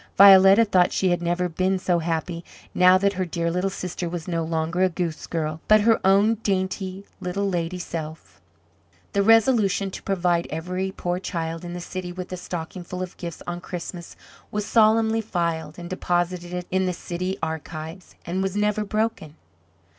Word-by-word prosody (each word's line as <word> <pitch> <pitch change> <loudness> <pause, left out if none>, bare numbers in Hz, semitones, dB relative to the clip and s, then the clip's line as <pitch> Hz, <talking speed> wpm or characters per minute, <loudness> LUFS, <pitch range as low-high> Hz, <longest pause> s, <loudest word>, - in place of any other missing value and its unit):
Violetta 195 +2 +8
thought 185 -4 +3
she 190 - +1
had 175 0 +1
never 175 +1 0
been 185 +3 0
so 180 -2 +1
happy, 170 +1 -3 0.3
now 180 +1 +6
that 200 +1 +1
her 185 0 -1
dear 170 -1 -2
little 180 +3 0
sister 180 -2 -4
was 170 -2 -5
no 165 -2 -1
longer 165 +2 -1
a 185 - +4
goose 170 -2 -4
girl, 155 -1 -3
but 215 0 +6
her 225 +1 +4
own 200 +3 +5
dainty 190 -1 -2
little 200 +3 -2
lady 175 -1 -2
self. 160 - -7 0.7
The 200 - +2
resolution 210 -3 +3
to - - -7
provide 175 -5 0
every 180 +5 -3
poor 180 -2 -3
child 165 -3 -4
in 175 0 -6
the 175 - -5
city 180 0 -6
with 185 0 -7
a - - -4
stocking 175 0 -6
full 180 +1 -5
of 180 - -8
gifts 170 -3 -7
on 175 0 -5
Christmas 175 -1 -7 0.3
was 210 0 -3
solemnly 225 0 +3
filed, 170 -6 -2
and 175 -1 -7
deposited 175 0 -2
in 190 0 +1
the 180 - 0
city 180 +2 -4
archives, 160 +2 -6
and 180 +3 -2
was 195 0 -2
never 210 0 +1
broken. 215 -7 -2
180 Hz, 175 wpm, -24 LUFS, 170-195 Hz, 0.7 s, Violetta